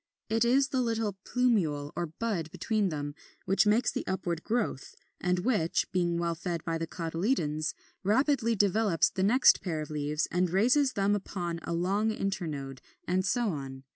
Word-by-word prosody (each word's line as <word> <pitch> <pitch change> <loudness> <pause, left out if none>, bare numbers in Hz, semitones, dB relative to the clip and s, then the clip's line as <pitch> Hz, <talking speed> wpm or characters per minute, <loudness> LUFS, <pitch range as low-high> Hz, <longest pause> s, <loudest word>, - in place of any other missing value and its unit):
It 225 +1 +2
is 265 +3 +3
the 260 - 0
little 225 -4 -1
plumule 175 -13 +1
or 175 - -2
bud 170 -1 -3
between 215 +2 0
them 145 -2 -4 0.3
which 195 +3 +3
makes 230 +4 +3
the - - -3
upward 175 -3 -2
growth, 215 - -2 0.2
and 180 0 +1
which, 180 -4 +1
being 175 -2 +1
well 170 0 0
fed 170 0 -4
by 165 -1 -1
the 165 - -3
cotyledons, 165 - -1 0.3
rapidly 230 +3 +2
develops 200 -3 +2
the 190 - -3
next 230 +8 +5
pair 165 -5 -2
of 155 0 -6
leaves 150 +1 -1
and 180 0 +1
raises 250 - +3
them 200 -1 +2
upon 175 -4 -3
a 170 - -4
long 195 +6 +1
internode, 155 -11 -3 0.3
and 185 +1 +1
so 235 +3 +1
on. 135 -5 -6
185 Hz, 170 wpm, -29 LUFS, 165-220 Hz, 0.3 s, next